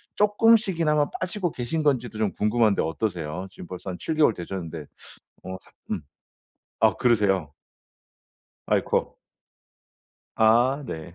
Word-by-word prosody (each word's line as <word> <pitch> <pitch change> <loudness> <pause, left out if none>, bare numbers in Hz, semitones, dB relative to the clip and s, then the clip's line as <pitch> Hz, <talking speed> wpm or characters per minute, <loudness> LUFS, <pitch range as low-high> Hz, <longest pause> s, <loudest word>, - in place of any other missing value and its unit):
조금씩이나마 205 -8 +3
빠지고 185 -1 -2
계신 130 +6 -3
건지도 125 -7 0
좀 110 -2 0
궁금한데 105 -1 +2
어떠세요? 85 0 -3
지금 90 - -11
벌써 90 +2 -7
한 90 - -6
7 160 - -3
개월 150 -7 +4
되셨는데 85 -4 -6 0.6
어 95 0 -6 0.4
음. - - -1 0.8
아 - - +5
그러세요? 95 - +2 1.2
아이코. - - 0 1.2
아 120 +6 +4
네. 80 -2 -7
110 Hz, 250 characters per minute, -25 LUFS, 90-150 Hz, 1.2 s, 아